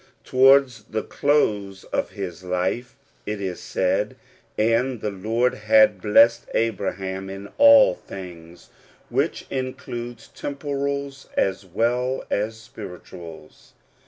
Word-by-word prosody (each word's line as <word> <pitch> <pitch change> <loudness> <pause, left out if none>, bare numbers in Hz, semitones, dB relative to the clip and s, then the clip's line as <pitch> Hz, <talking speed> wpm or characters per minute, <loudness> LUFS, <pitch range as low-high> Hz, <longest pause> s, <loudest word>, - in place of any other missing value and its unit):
Towards 130 -4 +4
the 110 -1 -3
close 105 -10 0
of - - -2
his 95 -3 -7
life 90 +7 -2 0.3
it 105 0 -3
is 95 -3 -4
said, 95 +3 -1 0.4
"and 115 +3 +1
the 105 - -3
Lord 115 +6 0
had 110 -2 +4
blessed 115 +3 +5
Abraham 95 -3 -2
in 95 +1 -8
all 285 -1 +8
things," 85 -2 -11 0.4
which - - 0
includes 120 -2 -5
temporals 140 -1 -4
as 95 0 0
well 125 +7 0
as 110 +2 -1
spirituals. 90 -8 -11
110 Hz, 105 wpm, -23 LUFS, 95-125 Hz, 0.4 s, all